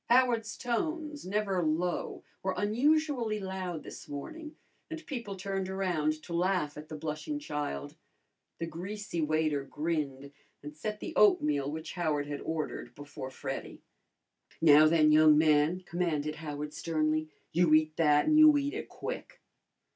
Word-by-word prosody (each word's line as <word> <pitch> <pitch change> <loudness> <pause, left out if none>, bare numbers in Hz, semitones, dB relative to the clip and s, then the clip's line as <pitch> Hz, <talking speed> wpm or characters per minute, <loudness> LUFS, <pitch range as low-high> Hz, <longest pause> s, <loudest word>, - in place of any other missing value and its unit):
Howard's 235 -3 +3
tones, 300 - -3
never 195 -2 0
low, 170 +2 -1 0.2
were 190 0 -1
unusually 245 0 +1
loud 190 -4 -4
this - - -10
morning, 305 - -7 0.3
and 320 -1 -7
people 235 -8 -5
turned 195 0 -3
around 160 -5 -1
to 170 - -7
laugh 175 -4 0
at 150 +1 -10
the 155 - -6
blushing 155 - -4
child. 145 - -4 0.6
The 165 - -3
greasy 180 +2 -5
waiter 155 -2 +1
grinned 140 -2 -3 0.3
and 150 +1 -8
set 210 +7 -5
the - - -5
oatmeal 150 -9 +4
which 160 +1 -6
Howard 155 -5 0
had 145 -1 -5
ordered 160 -1 -4
before 145 -2 -8
Freddy. - - -6 0.8
"Now, 155 -1 +7
then, 155 -1 +4
young 155 0 +7
man," 155 +3 +3
commanded 170 -4 -2
Howard 150 -1 -5
sternly, 155 -1 0 0.2
"you 170 -1 +3
eat 155 0 +2
that, 150 -2 +4
and 310 0 +4
you 305 -1 +8
eat 285 0 -1
it - - -5
quick!" - - -7
165 Hz, 145 wpm, -30 LUFS, 150-210 Hz, 0.8 s, you